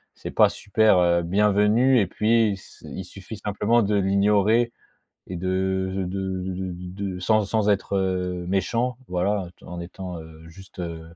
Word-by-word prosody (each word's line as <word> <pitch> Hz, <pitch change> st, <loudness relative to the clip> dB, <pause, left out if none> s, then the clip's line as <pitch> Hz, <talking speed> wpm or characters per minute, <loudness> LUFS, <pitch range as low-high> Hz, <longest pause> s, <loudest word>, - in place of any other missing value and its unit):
C'est -, -, -7 dB
pas -, -, +5 dB
super, 110 Hz, -1 st, +2 dB
heu, 85 Hz, -1 st, +3 dB
bienvenu 105 Hz, +7 st, +3 dB
et 100 Hz, -, +2 dB
puis 110 Hz, +2 st, +2 dB
il -, -, 0 dB
s 95 Hz, -, -13 dB
il 95 Hz, -, -6 dB
suffit 100 Hz, +3 st, -10 dB
simplement 105 Hz, +3 st, +1 dB
de 105 Hz, +1 st, 0 dB
l'ignorer 105 Hz, +4 st, +3 dB, 0.6 s
et 90 Hz, -, -6 dB
de 95 Hz, +1 st, -1 dB
de 95 Hz, -, -1 dB
de 95 Hz, 0 st, -3 dB
de 95 Hz, 0 st, -4 dB, 0.3 s
de 95 Hz, -2 st, -3 dB
de -, -, -7 dB
sans 110 Hz, +2 st, +2 dB
sans 105 Hz, +1 st, 0 dB
être, 100 Hz, -1 st, +1 dB
heu, 90 Hz, -2 st, -1 dB
méchant, 115 Hz, +6 st, 0 dB
voilà, 90 Hz, +1 st, 0 dB
étant -, -, -15 dB
en 85 Hz, -, -5 dB
étant, 90 Hz, 0 st, -7 dB
heu, 80 Hz, 0 st, -13 dB
juste, 95 Hz, +3 st, -15 dB
heu, 85 Hz, -2 st, -5 dB
95 Hz, 180 wpm, -24 LUFS, 90-105 Hz, 0.6 s, pas